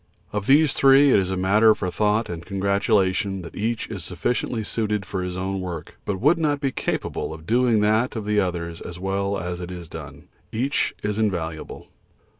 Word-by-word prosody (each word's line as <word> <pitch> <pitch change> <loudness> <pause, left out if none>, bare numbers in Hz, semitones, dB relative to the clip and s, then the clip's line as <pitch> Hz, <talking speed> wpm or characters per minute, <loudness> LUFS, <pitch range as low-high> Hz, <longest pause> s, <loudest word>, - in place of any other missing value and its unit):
Of 105 -1 -2
these 145 +1 +5
three 135 +1 +6
it - - +6
is 95 -1 -1
a 95 - -1
matter 105 +4 +5
for 90 -2 -3
thought 105 +3 +1
and 85 -1 -6
congratulation 100 0 +1
that 85 - -10
each 110 +2 -1
is 100 -6 -6
sufficiently 110 +6 -2
suited 105 -2 -1
for 90 +1 -3
his 90 0 -4
own 95 +1 -2
work, 90 -4 -6
but 95 -2 -2
would 150 - +4
not 145 -3 +1
be 140 -2 0
capable 80 - -3
of 80 0 -13
doing 120 0 +3
that 110 +4 +2
of 110 -2 -4
the 105 0 +2
others 85 -3 -2
as 85 - -7
well 100 +2 -1
as 90 0 -4
it 90 - -6
is 90 -2 -7
done. - - -9 0.3
Each 130 +5 0
is 105 +1 -1
invaluable. 85 -7 -3
100 Hz, 195 wpm, -23 LUFS, 90-110 Hz, 0.3 s, three